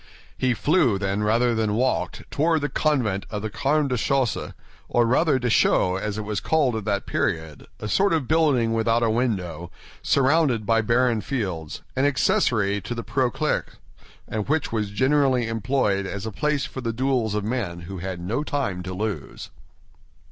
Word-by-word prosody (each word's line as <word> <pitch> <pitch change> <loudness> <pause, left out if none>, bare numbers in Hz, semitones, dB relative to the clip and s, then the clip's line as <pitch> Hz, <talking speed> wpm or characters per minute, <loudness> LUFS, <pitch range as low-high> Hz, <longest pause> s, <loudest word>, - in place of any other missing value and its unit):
He 125 -1 +1
flew, 145 - +2
then, 100 +1 -1
rather 115 +3 +2
than 110 -2 0
walked, 105 -8 -1
toward 160 +1 +2
the 145 - -1
convent 120 -11 0
of 105 -1 -4
the 110 - -3
Carmes 145 +2 +1
Déchaussés, 125 -1 0 0.3
or 120 - +3
rather 140 +4 +3
Deschaux, 115 -6 +2
as 105 +2 -3
it 110 - -3
was 105 -1 -2
called 145 -7 +1
at 110 -2 -4
that 100 -2 -1
period, 80 -3 -2
a - - -5
sort 195 - +2
of 155 -6 0
building 145 -8 +2
without 115 +1 +2
a 115 - +2
window, 90 -9 -2 0.3
surrounded 135 -5 +2
by 115 0 +3
barren 120 0 +2
fields—an 95 - -4
accessory 110 -7 +2
to 105 +5 -5
the 115 - -4
Preaux 130 -3 0
Clercs, - - -2 0.5
and 110 +2 -4
which 160 0 0
was 105 -3 -1
generally 130 +2 +2
employed 115 -4 0
as 100 +1 -5
the 110 - -4
place 150 +5 0
for 130 - -7
the 115 -2 -2
duels 125 -3 0
of 105 - -1
men 105 -7 -3
who 95 +2 -7
had 95 0 -5
no 110 +12 -2
time 135 -12 -2
to 90 0 -6
lose. 105 +1 -5
115 Hz, 170 wpm, -24 LUFS, 100-135 Hz, 0.5 s, or